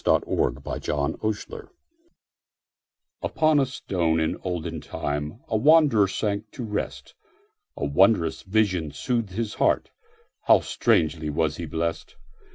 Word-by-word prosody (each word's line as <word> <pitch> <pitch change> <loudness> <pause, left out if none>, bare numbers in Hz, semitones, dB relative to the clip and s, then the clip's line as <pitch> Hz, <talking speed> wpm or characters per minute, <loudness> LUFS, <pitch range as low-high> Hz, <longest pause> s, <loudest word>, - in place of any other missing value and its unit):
Isaacs - - +3
Pillow - - +1
and 70 - -2
Stone - - -10 1.5
UPON 155 -2 +2
a 135 - +2
stone 85 -10 -1
in 80 0 0
olden 90 -4 -3
timeA 75 +10 -4
wanderer 145 -7 +5
sank 105 +2 -2
to 125 - -6
rest.A 420 - -7
wondrous 80 +1 +3
vision 95 -5 +1
soothed 115 - -2
his 110 +1 -3
heartHow - - 0
strangely 80 -1 +1
was 75 0 0
he 85 - -5
blessed! 80 +2 -3
95 Hz, 110 wpm, -25 LUFS, 80-115 Hz, 1.5 s, wanderer